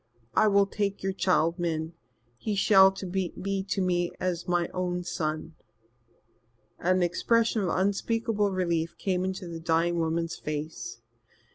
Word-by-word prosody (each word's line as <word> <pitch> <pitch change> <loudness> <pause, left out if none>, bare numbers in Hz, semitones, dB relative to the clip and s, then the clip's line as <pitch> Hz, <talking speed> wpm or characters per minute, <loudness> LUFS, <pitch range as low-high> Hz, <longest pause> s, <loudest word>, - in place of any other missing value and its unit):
"I 215 - +4
will 200 -1 +5
take 200 0 -2
your 195 0 0
child, 175 -2 +1
Min. 160 -1 -2 0.4
He 205 - -3
shall 195 -1 +7
be 190 0 -3
to 190 - 0
me 175 -1 +1
as 180 -1 -2
my 175 -1 +1
own 180 -1 -2
son." 160 -2 -3 1.3
An 185 +1 +2
expression 225 +6 +2
of 185 - 0
unspeakable 205 +2 +1
relief 170 -3 -1
came 185 -2 -1
into 190 0 -3
the 165 -1 -6
dying 170 +1 +1
woman's 165 +1 -1
face. 155 - -5
180 Hz, 135 wpm, -28 LUFS, 170-195 Hz, 1.3 s, shall